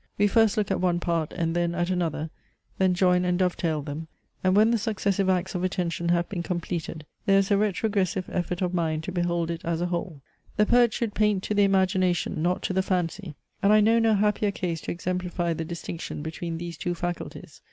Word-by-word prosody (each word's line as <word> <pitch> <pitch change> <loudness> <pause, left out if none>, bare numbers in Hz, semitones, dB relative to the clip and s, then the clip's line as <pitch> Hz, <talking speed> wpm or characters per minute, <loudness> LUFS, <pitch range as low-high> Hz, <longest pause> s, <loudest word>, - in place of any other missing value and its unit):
We 205 - +4
first 220 +1 +3
look 210 -2 0
at 190 - 0
one 175 -2 +2
part, 170 -3 -1
and 165 0 -2
then 170 0 0
at 175 +1 0
another, 160 -3 -1 0.5
then 185 -1 +3
join 180 -1 +3
and 180 0 +1
dove 180 -1 +1
tail 155 -4 -1
them; 155 +2 -6 0.4
and 185 0 +3
when 215 +2 +5
the 235 - +2
successive 200 -3 0
acts 185 0 0
of 180 -1 -2
attention 175 -2 -1
have 175 0 +2
been 185 -4 -4
completed, 170 -2 -4 0.2
there 195 0 +5
is 195 +1 +1
a - - +6
retrogressive 200 -3 0
effort 180 +1 -1
of 180 0 -1
mind 160 -3 0
to 185 - -4
behold 175 -2 0
it 170 +1 -5
as 165 -1 -1
a 175 - 0
whole. 175 -4 -4 0.4
The 210 - +5
poet 240 0 +4
should 225 -2 -2
paint 210 -3 +1
to - - -2
the 205 -1 +4
imagination, 185 -4 +1
not 180 +2 0
to - - -1
the 190 - +2
fancy; 180 -2 -2 0.3
and 200 - +4
I 215 - +7
know 225 +2 +4
no 225 -1 +3
happier 210 0 +2
case 175 -5 -3
to - - -4
exemplify 180 -1 -2
the 165 0 -4
distinction 170 -2 -6
between 165 +1 -4
these 170 -1 -6
two 175 +3 -2
faculties. 175 0 -6
180 Hz, 215 wpm, -26 LUFS, 170-195 Hz, 0.5 s, I